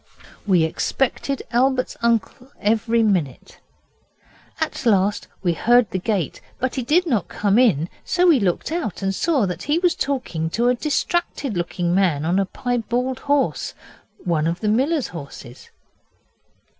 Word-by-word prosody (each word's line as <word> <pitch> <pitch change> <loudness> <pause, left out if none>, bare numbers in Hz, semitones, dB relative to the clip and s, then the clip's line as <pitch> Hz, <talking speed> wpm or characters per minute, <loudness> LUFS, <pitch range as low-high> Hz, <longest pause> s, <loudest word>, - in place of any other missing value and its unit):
We 180 -4 +4
expected 270 - -1
Albert's 255 +1 +1
uncle 235 +3 0
every 225 +2 +2
minute. 180 - -1 1.0
At 315 -3 -2
last 205 -3 +2 0.2
we 175 -2 +2
heard 240 +4 +3
the 185 - -1
gate, 190 - -2 0.2
but 260 0 -2
he 260 - -2
did 315 +9 +2
not 235 - 0
come 205 +2 +1
in, 175 - +3 0.2
so 360 0 +1
we 330 -7 +6
looked 190 - -1
out 315 - -3
and 195 0 0
saw 280 - +1
that 180 -3 -4
there - - -9
he - - +3
was 350 0 +2
talking 240 - -2
to 235 +8 +1
a - - +4
distracted 295 - -1
looking 175 0 -1
man 175 -6 +2
on 175 +4 +2
a 195 - 0
piebald 245 +2 -2
horse 285 -1 0 0.4
one 165 -4 0
of 170 +1 -2
the 215 - 0
miller's 270 +6 +1
horses. 140 -6 -10
225 Hz, 155 wpm, -22 LUFS, 180-265 Hz, 1.0 s, we